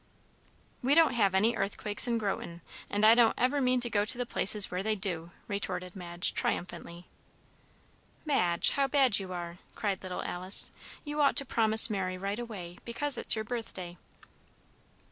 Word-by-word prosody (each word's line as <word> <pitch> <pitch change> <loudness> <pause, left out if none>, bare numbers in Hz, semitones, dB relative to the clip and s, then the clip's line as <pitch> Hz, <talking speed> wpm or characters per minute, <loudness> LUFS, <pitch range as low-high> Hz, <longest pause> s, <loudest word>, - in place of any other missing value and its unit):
"We 270 +4 +3
don't 325 -1 +5
have 200 -5 +2
any 220 +5 +3
earthquakes 210 +1 0
in 235 -1 +1
Groton, 185 -5 -4 0.3
and 205 +1 +1
I 220 - +8
don't 235 -1 +4
ever 255 +4 +1
mean 255 -1 +2
to 240 - -1
go 205 -1 +2
to 245 +4 -2
places 210 -3 +3
where 180 +1 -2
they 215 +2 0
do," 175 -5 -2 0.2
retorted 185 -2 -4
Madge, 175 -2 -3
triumphantly. 175 0 -3 1.2
"Madge, 180 - +2
how 275 -1 +1
bad 265 -6 +3
you 190 -2 -7
are!" 175 0 -6 0.2
cried 200 -3 -2
little 185 -1 -5
Alice. 185 +2 +1 0.3
"You 295 0 -2
ought 280 - +3
to 280 - +2
promise 220 -3 +3
Mary 190 -4 -3
right 200 +4 -3
away, 195 -7 -8
because 270 +4 -2
it's - - +2
your 220 0 -3
birthday." 190 -7 -6
205 Hz, 165 wpm, -30 LUFS, 185-240 Hz, 1.2 s, I